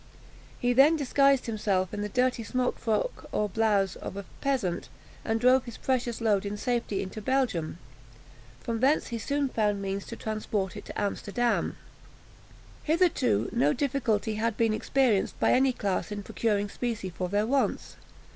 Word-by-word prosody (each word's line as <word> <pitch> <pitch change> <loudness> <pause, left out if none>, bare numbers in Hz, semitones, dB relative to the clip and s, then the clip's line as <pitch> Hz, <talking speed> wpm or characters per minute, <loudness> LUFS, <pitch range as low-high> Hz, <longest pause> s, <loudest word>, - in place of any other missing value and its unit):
He 245 0 +2
then 280 +6 +6
disguised 275 -2 +3
himself 200 -4 0
in 205 - -3
the 210 - -3
dirty 250 +1 +1
smock 250 +3 -1
frock, 230 - -1
or 210 - 0
blouse, 205 -2 +1
of 195 - -7
a 200 - -6 0.2
peasant, 235 - -1 0.3
and 225 0 0
drove 255 +2 +4
his 235 -2 -8
precious 250 -3 -1
load 210 -4 +2
in 205 0 -4
safety 235 -3 -1
into 195 +3 -7
Belgium. 230 -11 0 0.8
From 230 -1 -3
thence 275 +5 +2
he 235 - -3
soon 285 +4 0
found 210 -4 0
means 195 0 -4
to - - -6
transport 215 -3 -3
it 205 - -8
to - - -6
Amsterdam. 210 +3 -1 1.0
Hitherto 310 - +2
no 145 +2 +3
difficulty 235 -6 0
had 230 -1 0
been 225 -2 +2
experienced 235 -3 +1
by - - +3
any 265 +1 +4
class 205 -4 -2
in 205 -1 -4
procuring 205 -1 0
specie 215 -3 -4
for 180 +1 -4
their 205 +2 +1
wants. 270 +4 0
225 Hz, 160 wpm, -28 LUFS, 205-255 Hz, 1.0 s, then